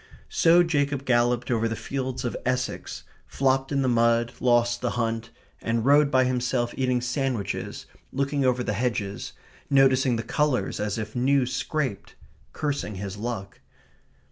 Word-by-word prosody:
So 170 +1 +5
Jacob 145 -4 0
galloped 120 0 +2
over 115 -1 +1
the 115 - -2
fields 130 0 -4
of 120 - -2
Essex, 125 0 -2 0.2
flopped 135 0 +1
in 140 -1 +1
the - - +1
mud, 115 -1 +3
lost 120 -1 +2
the 125 - 0
hunt, 115 0 -1 0.3
and 115 0 -1
rode 145 +1 +5
by 130 -1 +4
himself 125 -1 0
eating 125 -2 +1
sandwiches, 125 -3 -3 0.3
looking 140 +1 0
over 125 -1 +2
the 105 - -1
hedges, 105 -3 -2 0.4
noticing 135 -2 +4
the 115 - -3
colours 150 +2 0
as 105 0 -2
if 110 -1 -5
new 130 +2 +3
scraped, 130 -4 -3 0.4
cursing 145 -8 -3
his 100 0 -5
luck. 105 -3 -5
125 Hz, 145 wpm, -25 LUFS, 115-135 Hz, 0.4 s, So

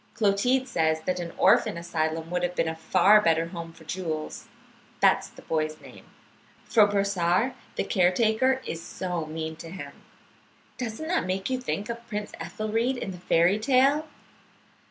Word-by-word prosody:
"Clotilde 245 +5 +2
says 160 -4 +1
that 180 +2 -2
an 170 -1 -5
orphan - - +4
asylum 165 -1 -2
would 180 0 0
have 175 0 -1
been 165 - +1
a 160 - -2
far 185 +6 +5
better 165 -2 +2
home 170 -2 -7
for 165 0 -17
Jules 160 -2 -4 0.5
(that - - +5
is - - -11
the - - -15
boy's 155 -1 -2
name), - - -14 0.6
for 215 -3 +5
Brossard, 200 +3 +1 0.2
the - - 0
caretaker, 220 +8 +2
is 165 - -5
so 175 -2 -4
mean 160 0 -5
to 165 - -9
him. 185 +2 -7 0.9
Doesn't 250 +5 -4
that 340 - 0
make 190 +5 -2
you 255 -1 -1
think 210 -4 -3
of 235 0 -6
Prince 210 -2 -4
Ethelried 225 +4 -1
in 195 - -4
the 180 - -9
fairy 175 +3 +3
tale? 275 +6 +3
185 Hz, 165 wpm, -26 LUFS, 165-225 Hz, 0.9 s, far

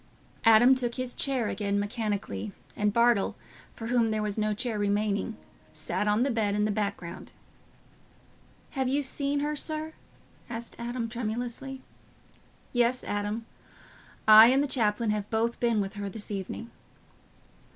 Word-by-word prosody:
Adam 225 +3 +7
took 245 -2 -1
his 255 -1 -3
chair 260 -5 0
again 200 0 -1
mechanically, 205 - -3 0.2
and 210 0 +1
Bartle, 235 -2 +3 0.4
for 225 - -7
whom 235 -1 +2
there 215 -1 -1
was 210 -1 -2
no 215 -1 0
chair 215 +1 -2
remaining, 205 +1 0 0.4
sat 210 - -2
on 210 +3 +3
the 275 - +1
bed 210 -3 0
in 210 0 +2
the 210 - +1
background. 200 -4 -4 1.4
"Have 265 -2 -1
you 280 +3 +1
seen 280 +1 -1
her, 300 +1 -1
sir?" 310 +1 -2 0.6
said 230 0 -6
Adam 235 0 -3
tremulously. 245 +3 -4 0.9
"Yes, 245 +1 +2
Adam; 205 +2 -3 0.8
I 215 +1 +10
and 265 +3 +4
the - - -1
chaplain 220 -4 +1
have 210 -1 -2
both 230 +1 0
been 235 -3 +2
with 195 +1 -4
her 205 -1 -4
this 210 +1 -7
evening." 200 +4 -5
225 Hz, 145 wpm, -28 LUFS, 210-245 Hz, 1.4 s, I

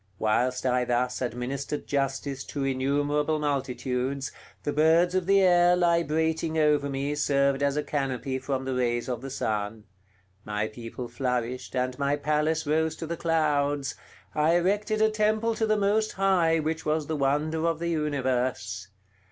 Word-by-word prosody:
Whilst 125 +5 0
I 125 -1 +2
thus 125 +1 0
administered 130 +4 -3
justice 135 -1 -2
to 140 - -4
innumerable 145 +3 0
multitudes, 135 -2 -2 0.3
the 145 - -1
birds 165 +4 +4
of 185 -1 0
the 195 0 +5
air 175 -1 +5
librating 160 -2 +1
over 150 -2 +3
me 140 +1 -2
served 140 -1 +1
as 140 0 +1
a 150 - 0
canopy 135 -2 -2
from 130 0 -3
the 130 - -2
rays 120 -1 0
of 125 -3 -3
the 135 - -6
sun; 110 -3 -3 0.6
my 105 0 -2
people 115 +2 -7
flourished, 125 0 -3
and 125 +1 -1
my 140 0 +1
palace 150 +2 0
rose 160 +1 +1
to 165 - -6
the 170 +1 -3
clouds; 145 -4 +1 0.4
I 155 +2 +3
erected 210 +5 +1
a 220 - +4
temple 215 +1 +1
to 220 0 0
the 215 0 +2
Most 210 +2 +1
High 185 -4 +3
which 160 +1 -2
was 155 0 0
the 160 - -2
wonder 150 +4 0
of 165 -2 0
the 170 +1 -2
universe. 130 - -1
145 Hz, 160 wpm, -27 LUFS, 130-160 Hz, 0.6 s, the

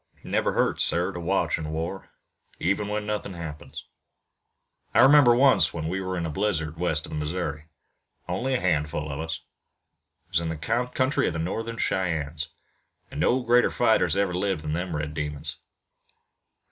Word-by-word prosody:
"It - - -9
never - - +1
hurts, - - +2
sir, 90 +3 +2
to 85 - -6
watch 85 - 0
in 75 -1 -4
war, 85 +5 -4 0.5
even 100 +3 0
when 105 0 -2
nothing 105 -3 -3
happens. 80 -3 -7 1.1
I - - +7
remember 135 -3 +7
once 135 -5 +4
when 80 -1 -3
we 95 +3 -2
were 95 0 -3
in 85 - -2
a - - -2
blizzard 80 -4 -1
west 80 -3 0
of - - -11
the 75 - -3
Missouri, 75 -1 -3 0.6
only 120 +9 -1
a - - +1
hundred 75 -4 +1
of 75 -1 -4
us. 80 0 -4 0.8
It - - -41
was 90 -3 +2
in 85 -1 -3
the 80 - -3
country 125 - 0
of - - -1
the - - -3
Northern 115 +8 -3
Cheyennes, 80 -6 -1 0.6
an' - - -6
no 130 +2 +3
greater 120 +1 +4
fighters - - +2
ever 100 -2 +1
lived 95 -3 -1
than 75 0 -2
them 90 0 -2
red 75 0 -3
demons. 75 -1 -4
85 Hz, 175 wpm, -26 LUFS, 80-105 Hz, 1.1 s, I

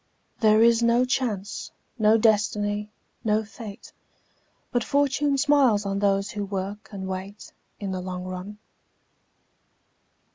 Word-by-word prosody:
There 215 0 +5
is 235 0 +5
no 235 +2 +4
Chance, 220 -6 -2 0.3
no 215 +1 +5
Destiny, 210 -1 +1 0.3
no 215 -1 +2
Fate, 210 0 -10 0.8
But 245 -1 +1
Fortune 280 +2 +1
smiles 265 -7 +3
on 195 0 -1
those 200 0 +1
who 205 - -3
work 195 +1 -5
and 190 -2 -6
wait, 190 +2 -7 0.3
In 200 -2 -4
the 185 -1 -3
long 180 0 -5
run. 185 +3 -7
210 Hz, 120 wpm, -25 LUFS, 195-235 Hz, 0.8 s, There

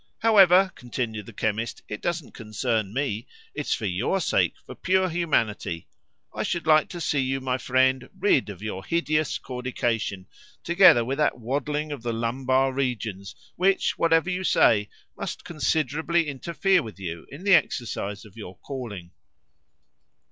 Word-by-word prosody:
"However," 195 -4 +6
continued 115 -4 -5
the - - -9
chemist, 110 +2 -2
"it 105 - -6
doesn't 170 -5 -3
concern 110 -1 -2
me. 120 -3 -2 0.3
It's 150 0 -1
for 110 - -5
your 105 - 0
sake, 175 - +1
for - - -9
pure 185 0 +1
humanity! 115 - -1 0.5
I - - -3
should 170 -2 -2
like 155 -1 +4
to 175 - -7
see 150 -3 0
you, 135 0 0
my 130 -1 -2
friend, 130 0 +1
rid 185 - +2
of 100 0 -9
your 95 -3 -4
hideous 155 -1 0
caudication, 120 -6 -3 0.4
together 170 -10 +6
with 135 +4 -3
that 150 -4 +2
waddling 145 +5 -2
of 140 -4 -5
the 120 0 -2
lumbar 130 +3 +1
regions 110 -7 -3 0.2
which, 190 +2 +2
whatever 165 +2 +3
you 180 +1 -2
say, 105 - +3 0.3
must - - -6
considerably 160 +1 0
interfere 170 +6 +1
with 110 -6 -9
you 85 -3 -6
in 145 +6 -10
the 200 -1 +4
exercise 110 - 0
of 105 - -16
your 95 -5 -9
calling." 105 -10 -7
130 Hz, 150 wpm, -25 LUFS, 110-160 Hz, 0.5 s, However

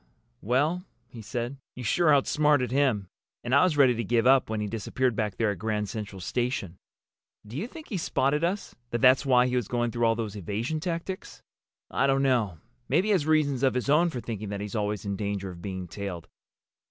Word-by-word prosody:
"Well," 145 - +1 0.3
he 115 - -10
said, 120 +4 -4 0.2
"you 125 - -7
sure 155 +8 +3
outsmarted 145 -2 +3
him! 130 -8 +1 0.4
And 120 - -2
I 140 - +6
was 175 -5 +2
ready 130 -3 +6
to 115 0 -2
give 115 +2 +1
up 130 -2 +5
when 110 -1 -2
he 105 - -1
disappeared 115 +3 -1
back 105 -3 -2
there 110 -2 +2
at 100 - -6
Grand 105 0 -1
Central 105 -3 -6
Station. 100 -3 -2 0.7
Do 105 +3 -10
you 180 - -3
think 315 +4 -11
he 200 - -2
spotted 150 0 +1
us—that 120 -10 -3
that's 130 +2 +5
why 125 -1 +5
he 125 0 -1
was 120 -5 0
going 120 -1 0
through 120 0 0
all 115 - +3
those 110 -3 -4
evasion 105 - -3
tactics?" 170 +3 -5 0.5
"I 135 - +2
don't 135 0 +2
know. 115 -10 +1 0.3
Maybe 205 +4 +2
he - - +3
has 175 -7 +2
reasons 145 -5 +2
of 135 -2 +2
his 125 +2 0
own 170 +4 +4
for 130 - -5
thinking 110 -3 -5
that 100 -1 -4
he's 105 +2 -5
always 105 -1 -2
in 100 -1 -2
danger 100 -2 -3
of 85 -1 -11
being 95 -2 -5
tailed. 90 -1 -6
120 Hz, 210 wpm, -27 LUFS, 105-140 Hz, 0.7 s, I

